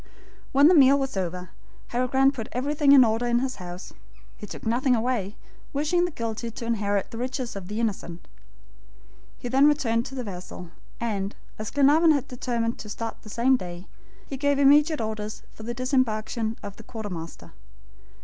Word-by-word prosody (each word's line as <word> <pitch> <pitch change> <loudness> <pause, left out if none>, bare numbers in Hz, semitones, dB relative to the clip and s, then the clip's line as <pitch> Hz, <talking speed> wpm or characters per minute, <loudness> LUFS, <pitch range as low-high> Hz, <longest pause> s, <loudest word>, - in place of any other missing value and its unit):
When 280 +2 +6
the 355 - +6
meal 280 -3 +7
was 270 -4 -2
over, 180 -1 -4 0.4
Harry 250 +1 0
Grant 270 +2 +3
put 225 -5 -6
everything 285 +3 +2
in 270 -3 +9
order 225 +2 0
in 240 0 +2
his 260 +1 -2
house. 180 -1 -8 0.4
He 210 - -9
took - - -9
nothing 250 +3 +2
away, 225 -4 -1 0.4
wishing 310 +5 +1
the - - -2
guilty 230 -5 -4
to 230 +1 -7
inherit 205 -3 -1
the 230 - -6
riches 255 -1 -3
of 195 -2 -7
the 210 +3 -4
innocent. 190 -6 -3 1.2
Then 245 - -3
they 270 +3 +6
returned 240 -5 +1
to 270 - -9
the 255 - -3
vessel, 180 -3 -8 0.3
and, 205 -4 -2 0.2
as 215 +1 -4
Glenarvan 300 +3 +5
had 285 -4 -1
determined 235 -2 -2
to 210 - -8
start 225 +2 -5
the 215 - -12
same 250 +4 +3
day, 175 -3 -8 0.4
he 270 - -6
gave 285 +1 +1
immediate 295 +3 +5
orders 215 -1 -4
for - - -13
the 235 +2 -4
disembarkation 230 -3 0
of 200 -1 -8
the 225 - -11
quartermaster. 190 -8 -7
235 Hz, 180 wpm, -25 LUFS, 215-270 Hz, 1.2 s, in